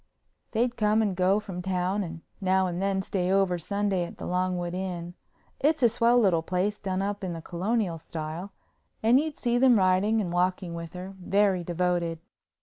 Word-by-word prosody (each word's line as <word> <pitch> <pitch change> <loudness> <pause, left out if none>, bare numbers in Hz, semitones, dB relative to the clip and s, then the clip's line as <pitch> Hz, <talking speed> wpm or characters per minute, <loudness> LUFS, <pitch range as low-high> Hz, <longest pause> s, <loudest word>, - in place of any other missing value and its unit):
They'd 240 +2 0
come 215 0 +3
and 200 -3 -1
go 185 +3 +3
from 190 -4 -6
town 185 +2 -1
and 165 -2 -7 0.2
now 190 0 +3
and 180 0 -3
then 195 -1 0
stay 185 -1 -1
over 190 -2 +2
Sunday 200 +1 0
at 170 - -8
the - - -7
Longwood 180 -1 -1
Inn—it's 185 - -3
a 240 - +7
swell 230 +2 +3
little 190 -8 +4
place 185 +5 -1
done 190 -1 -2
up 205 0 -3
in 180 -2 -2
the 165 - -5
Colonial 185 0 -1
style—and 175 - -2
you'd 310 0 -3
see 240 -1 +1
them 255 -2 +6
riding 190 +3 +3
and 180 -5 -2
walking 180 0 0
with 170 -1 -7
her, 185 +2 -7
very 195 -1 +2
devoted. 175 -1 0
185 Hz, 175 wpm, -27 LUFS, 175-210 Hz, 0.2 s, a